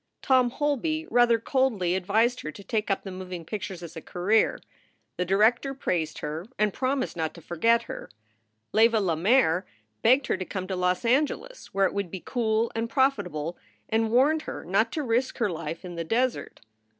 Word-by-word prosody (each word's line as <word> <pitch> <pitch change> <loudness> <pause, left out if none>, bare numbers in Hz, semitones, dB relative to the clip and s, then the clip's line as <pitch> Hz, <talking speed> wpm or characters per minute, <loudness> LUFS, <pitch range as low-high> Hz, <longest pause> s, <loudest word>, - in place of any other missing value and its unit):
Tom 255 -2 +4
Holby 300 +4 -1
rather 240 0 +5
coldly 225 -7 +1
advised 215 +7 +1
her 155 - -5
to 200 - -12
take 215 0 -2
up 195 - 0
the 195 - -6
moving 185 -2 -7
pictures 190 -2 -5
as 170 - -9
a 160 - -6
career. 195 +7 +1 0.6
The 180 - 0
director 225 +8 +2
praised 165 - -2
her 155 +5 -5
and 210 -1 +1
promised 260 0 -1
not 160 -2 -2
to 170 - -11
forget 230 +7 +2
her. - - -8 0.6
Leva 225 0 +5
Lemaire 185 0 +3 0.4
begged 260 +4 +4
her - - 0
to 185 - -3
come 185 0 -5
to 190 - -1
Los 180 +3 0
Angeles, 300 - 0
where 195 0 +4
it - - 0
would 200 -3 -2
be 190 - -6
cool 225 -2 0
and 225 +1 -2
profitable, 200 - 0 0.3
and 225 0 +1
warned 280 +7 +3
her - - -6
not - - +2
to 310 - -2
risk 245 +1 0
her 215 -6 +1
life 165 +1 -5
in 180 - -7
the 170 -1 -3
desert. 245 +8 -1
215 Hz, 185 wpm, -27 LUFS, 180-245 Hz, 0.6 s, rather